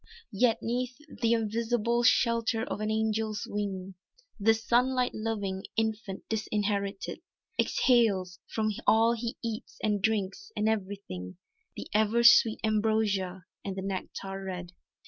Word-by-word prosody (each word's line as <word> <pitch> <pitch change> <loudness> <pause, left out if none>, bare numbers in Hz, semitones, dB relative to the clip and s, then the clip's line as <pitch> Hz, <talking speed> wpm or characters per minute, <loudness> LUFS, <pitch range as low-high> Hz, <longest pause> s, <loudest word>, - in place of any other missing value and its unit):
Yet 225 +3 +2
'neath 245 +2 -2 0.2
th' - - +1
invisible 230 +1 +1
shelter 230 -2 +3
of 240 - -4
an 215 - -1
Angel's 220 -1 0
wing 195 -2 -4 0.5
This 225 +2 +2
sunlight 250 +1 +2
loving 205 -4 -3
infant 220 -3 -2
disinherited, 205 -2 -2 0.4
Exhales 200 -8 +2
from 215 -1 -1 0.2
all 225 +1 +5
he 235 0 -4
eats 225 -1 -5
and 210 -2 +1
drinks, 220 - -1
and 210 - +1
everything 195 - -3 0.4
The - - -6
ever 220 +2 +3
sweet 230 -1 +7
ambrosia 210 -4 +1 0.2
and 195 -1 -4
the 190 - -4
nectar 195 0 -5
red. 180 -2 -5
215 Hz, 125 wpm, -29 LUFS, 195-230 Hz, 0.5 s, sweet